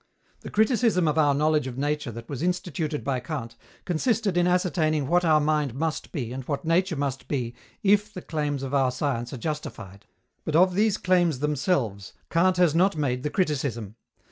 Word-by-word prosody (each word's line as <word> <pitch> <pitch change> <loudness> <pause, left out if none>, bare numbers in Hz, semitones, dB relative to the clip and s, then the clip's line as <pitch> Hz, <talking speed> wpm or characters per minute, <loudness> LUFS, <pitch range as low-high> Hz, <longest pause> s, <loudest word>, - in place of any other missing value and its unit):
The - - -9
criticism 220 -5 +2
of 155 +1 +1
our 145 -2 +4
knowledge 150 -1 +2
of 125 -1 -6
nature 145 0 -1
that 115 +1 -9
was 140 -2 -5
instituted 165 -4 -2
by 135 -2 -1
Kant 125 -3 -6 0.3
consisted 200 +3 0
in 175 0 +3
ascertaining 165 -5 +1
what 175 +5 +2
our 155 -2 +4
mind 150 -4 0
must 160 +2 -3
be 125 -7 -4
and 130 0 -5
what 145 +2 -3
Nature 170 +2 +2
must 140 -2 -3
be 125 -5 -2 0.3
if 205 +1 +3
the 180 - -8
claims 145 -3 -2
of 135 0 -5
our 135 -2 +3
science 125 -2 -2
are 135 - -5
justified; 110 - -6 0.4
but 155 - -2
of 180 +2 +5
these 210 +2 +2
claims 175 -5 +2
themselves 130 - -1 0.2
Kant 180 +2 +3
has 175 -4 +4
not 185 +3 +3
made 125 -4 -1
the 150 - -2
criticism. 135 - -1
150 Hz, 185 wpm, -26 LUFS, 135-180 Hz, 0.4 s, of